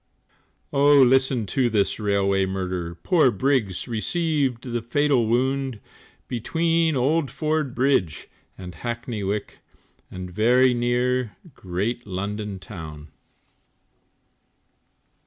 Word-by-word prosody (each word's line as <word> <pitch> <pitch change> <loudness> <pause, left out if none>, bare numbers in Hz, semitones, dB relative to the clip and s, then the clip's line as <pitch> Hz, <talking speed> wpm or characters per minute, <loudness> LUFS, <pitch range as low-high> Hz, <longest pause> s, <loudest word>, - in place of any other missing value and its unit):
Oh, 145 +1 +5
listen 130 -2 +3
to 125 +3 +1
this 105 -2 0
railway 100 -2 +1
murder 90 -3 -3
Poor 150 - +3
Briggs 120 -5 0
received 135 +1 -1
the 120 -2 -3
fatal 130 0 +1
wound, 130 0 0 0.5
Between 165 +6 0
Old 140 +3 +1
Ford 155 -4 -2
Bridge 125 - +1 0.3
and 90 -2 -8
Hackney 120 +3 -5
Wick 100 +1 -3 0.5
And 90 -1 -7
very 125 +6 +4
near 120 -1 0 0.2
great 105 +6 -3
London 100 +1 -4
town. 80 -6 -9
120 Hz, 100 wpm, -24 LUFS, 100-135 Hz, 0.5 s, Oh